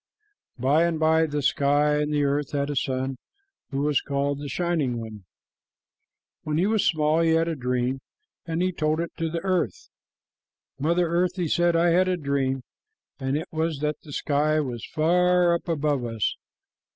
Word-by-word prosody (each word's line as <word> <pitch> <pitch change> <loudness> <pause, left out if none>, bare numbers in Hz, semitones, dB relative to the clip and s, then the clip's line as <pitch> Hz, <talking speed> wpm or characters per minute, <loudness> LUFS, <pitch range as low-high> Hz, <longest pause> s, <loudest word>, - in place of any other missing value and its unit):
By 140 +7 +3
and 165 -2 -1
by 160 0 +3
the 145 -1 -3
sky 145 +2 +2
and 150 0 -1
the 145 -1 +1
earth 140 0 -1
had 140 0 -1
a - - -3
son 130 0 -1 0.5
who 135 0 -2
was 150 -1 +2
called 140 0 -1
the 145 -1 -6
Shining 155 -5 -1
One. 110 -4 -9 1.2
When 150 0 -2
he 175 - +2
was 215 -1 +2
small, 155 -3 +2
he 165 -1 +3
had 165 +1 +2
a 165 - -1
dream, 125 0 -1 0.5
and 165 +2 -1
he 185 - +1
told 155 -2 0
it 170 0 -3
to 165 0 -1
the 165 +1 -4
earth. 190 - -1 0.9
"Mother 170 +4 +2
Earth," 175 +2 +1
he 180 -3 -1
said, 175 +2 +2
"I 170 +1 +4
had 185 +2 +3
a 185 -1 +1
dream, 135 -3 -1 0.6
and 135 +2 -1
it 160 +4 -5
was 160 -1 -1
that 150 0 -2
the 150 - -12
sky 150 +2 +1
was 125 -6 -4
far 180 +2 +3
up 170 - -3
above 150 -5 0
us. 115 -2 -1
155 Hz, 180 wpm, -25 LUFS, 140-170 Hz, 1.2 s, I